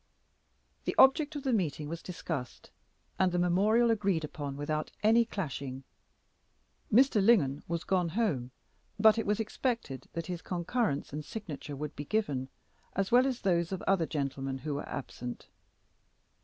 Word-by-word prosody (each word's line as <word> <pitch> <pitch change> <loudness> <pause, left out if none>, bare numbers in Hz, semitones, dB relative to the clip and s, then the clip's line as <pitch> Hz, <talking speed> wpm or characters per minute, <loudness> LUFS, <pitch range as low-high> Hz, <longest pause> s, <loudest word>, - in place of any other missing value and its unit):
The - - -1
object 295 +3 +5
of 290 - -4
the 265 -3 +1
meeting 155 -7 0
was 165 +2 -5
discussed, 160 -7 -6 0.5
and 185 -1 +4
the 175 - 0
memorial 205 +7 +3
agreed 200 -7 +1
upon 145 -2 -5
without 155 +1 -2
any 230 +2 +5
clashing. 140 - -4 1.1
Mr. 235 -3 +5
Lingon 155 - +4
was 170 0 -2
gone 180 -3 +1
home, 160 - 0 0.5
but 220 +1 +6
it 225 - -2
was 210 +1 +1
expected 225 - -2
that 165 -1 -3
his 180 -2 -5
concurrence 180 - -1
and 150 +1 -4
signature 155 -6 -6
would 150 +1 -5
be 145 - -5
given, 140 -10 -1 0.5
as 195 -1 0
well 250 +2 +6
as 255 -3 -2
those 170 -2 +1
of 190 - -4
other 190 -4 +2
gentlemen 135 -2 -2
who 150 +2 -4
were 140 - -4
absent. 125 -3 -6
175 Hz, 155 wpm, -31 LUFS, 145-220 Hz, 1.1 s, but